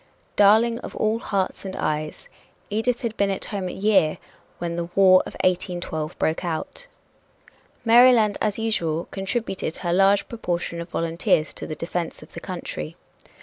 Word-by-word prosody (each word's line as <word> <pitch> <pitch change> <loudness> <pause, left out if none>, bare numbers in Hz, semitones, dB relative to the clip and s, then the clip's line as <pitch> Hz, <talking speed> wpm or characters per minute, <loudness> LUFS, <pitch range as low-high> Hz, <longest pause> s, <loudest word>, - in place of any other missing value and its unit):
"Darling 220 +3 +5
of - - -9
all 215 +1 +1
hearts 195 -4 -2
and 190 -1 -6
eyes," 155 0 -3 0.4
Edith 235 +4 0
had 225 -2 -2
been 200 0 +2
at 195 - -2
home 195 -3 -4
a - - -4
year 190 -6 +2 0.4
when 170 -1 -3
the 170 0 -2
War 185 -1 +7
of - - -9
1812 175 -4 -1
broke 160 +3 0
out. 180 - -4 1.0
Maryland, 230 -3 +6
as 210 -2 0
usual, 170 -8 -1
contributed 195 -3 -3
her 175 -2 -1
large 195 +2 +4
proportion 175 -6 -3
of 170 - -8
volunteers 165 -2 0
to - - -7
the 155 - -5
defense 170 +1 -4
of - - -17
the - - -6
country. 75 - -6
190 Hz, 155 wpm, -24 LUFS, 170-215 Hz, 1.0 s, War